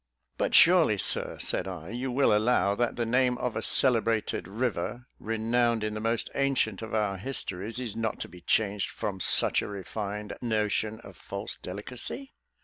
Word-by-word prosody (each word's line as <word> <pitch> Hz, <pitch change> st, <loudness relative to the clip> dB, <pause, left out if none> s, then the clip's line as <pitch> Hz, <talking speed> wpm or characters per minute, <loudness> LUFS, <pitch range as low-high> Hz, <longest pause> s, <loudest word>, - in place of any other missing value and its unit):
"But -, -, +1 dB
surely, 165 Hz, -, +6 dB
Sir," -, -, +1 dB
said -, -, -1 dB
I, 90 Hz, -1 st, -7 dB
"you 125 Hz, +2 st, -3 dB
will 130 Hz, -4 st, +3 dB
allow 105 Hz, -2 st, +3 dB
that 120 Hz, +3 st, 0 dB
the 120 Hz, -, -1 dB
name 125 Hz, +1 st, +2 dB
of 125 Hz, -2 st, -2 dB
a -, -, -1 dB
celebrated 115 Hz, -6 st, +2 dB
river, 120 Hz, +2 st, -2 dB
renowned 115 Hz, +1 st, +1 dB
in 105 Hz, 0 st, -2 dB
the 110 Hz, -, -4 dB
most 115 Hz, +1 st, 0 dB
ancient 135 Hz, -7 st, 0 dB
of 110 Hz, 0 st, -4 dB
our 105 Hz, -3 st, 0 dB
histories, 110 Hz, -2 st, -3 dB
is 120 Hz, -5 st, -4 dB
not 115 Hz, -1 st, -2 dB
to -, -, -3 dB
be 90 Hz, -, -14 dB
changed 100 Hz, +2 st, +1 dB
from 95 Hz, -2 st, -4 dB
such -, -, +4 dB
a -, -, -5 dB
refined 105 Hz, +1 st, -5 dB
notion 110 Hz, -1 st, -1 dB
of 100 Hz, -5 st, -13 dB
false 100 Hz, +5 st, -5 dB
delicacy?" 125 Hz, -, -6 dB
110 Hz, 170 wpm, -28 LUFS, 100-120 Hz, -, surely